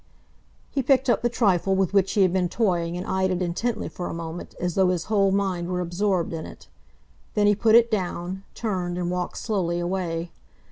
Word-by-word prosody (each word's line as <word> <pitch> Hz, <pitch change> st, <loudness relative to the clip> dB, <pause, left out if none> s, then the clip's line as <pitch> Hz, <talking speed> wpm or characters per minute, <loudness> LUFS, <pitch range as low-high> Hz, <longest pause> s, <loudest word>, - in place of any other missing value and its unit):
He 275 Hz, -, 0 dB
picked 265 Hz, 0 st, +3 dB
up -, -, +1 dB
the 240 Hz, -, +1 dB
trifle 195 Hz, -5 st, +2 dB
with 190 Hz, -1 st, +1 dB
which 195 Hz, -1 st, +3 dB
he 200 Hz, -, +4 dB
had 185 Hz, -2 st, +2 dB
been 180 Hz, -2 st, +1 dB
toying 175 Hz, -5 st, 0 dB
and 180 Hz, -, -5 dB
eyed 190 Hz, -3 st, 0 dB
it 185 Hz, -1 st, 0 dB
intently 215 Hz, +6 st, -2 dB
for 180 Hz, -, -5 dB
a -, -, -5 dB
moment, 165 Hz, 0 st, -7 dB
as 175 Hz, -1 st, -1 dB
though 190 Hz, 0 st, +3 dB
his 180 Hz, -2 st, 0 dB
whole 200 Hz, -2 st, +2 dB
mind 190 Hz, -3 st, 0 dB
were 180 Hz, 0 st, -2 dB
absorbed 180 Hz, 0 st, 0 dB
in 160 Hz, -1 st, -5 dB
it. -, -, -13 dB, 0.7 s
Then 210 Hz, -, +3 dB
he 205 Hz, -, +5 dB
put 220 Hz, +2 st, +4 dB
it 235 Hz, 0 st, +6 dB
down, 185 Hz, -2 st, -2 dB
turned, 180 Hz, -6 st, -2 dB
and 175 Hz, -1 st, -1 dB
walked 180 Hz, -1 st, -3 dB
slowly 185 Hz, -6 st, -1 dB
away. 175 Hz, -2 st, -2 dB
185 Hz, 205 wpm, -25 LUFS, 175-205 Hz, 0.7 s, it